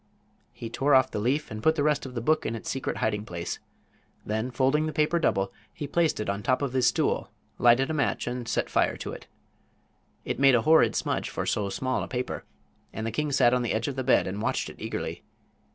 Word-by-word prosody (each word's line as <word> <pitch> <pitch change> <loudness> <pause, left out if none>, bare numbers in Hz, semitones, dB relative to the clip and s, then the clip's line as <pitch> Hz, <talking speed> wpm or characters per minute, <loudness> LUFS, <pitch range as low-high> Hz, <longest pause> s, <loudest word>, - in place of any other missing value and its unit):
He 115 - -7
tore 140 +3 +3
off 130 0 +4
the - - -2
leaf 135 +8 0
and 110 0 -5
put 160 +6 +3
the 145 - 0
rest 150 -2 +1
of 125 - -10
the 120 - -2
book 155 0 +3
in 115 - -2
its 115 - -5
secret 135 - -3
hiding 105 -1 -1
place. 85 -4 -5 0.7
Then, 110 +3 -2
folding 135 +5 +1
the 155 - -4
paper 155 +3 +2
double, 100 -11 0 0.2
he 150 - -6
placed 165 +2 +1
it 105 - -3
on 100 0 -1
the - - -10
top 130 +4 +1
of 135 -3 -2
his 130 -2 +3
stool, 120 - +1 0.3
lighted 125 +5 +4
a - - -1
match 145 -3 0
and 125 -1 -4
set - - 0
fire - - +1
to - - -5
it. - - -10 1.0
It - - -3
made 135 -2 +6
a 115 - +2
horrid 160 +1 +5
smudge - - -1
for - - -3
so 100 -2 0
small 130 +5 -1
a - - -4
paper, 125 0 -4 0.5
and 110 - -5
the 115 - -2
king 150 +6 -1
sat 120 -3 +4
on 125 - +2
the 120 - -1
edge 110 +1 -1
of 140 - -3
the 130 - -2
bed 130 - +4
and 100 +3 -4
watched - - -1
it - - -17
eagerly. - - -4
130 Hz, 240 wpm, -27 LUFS, 110-145 Hz, 1.0 s, made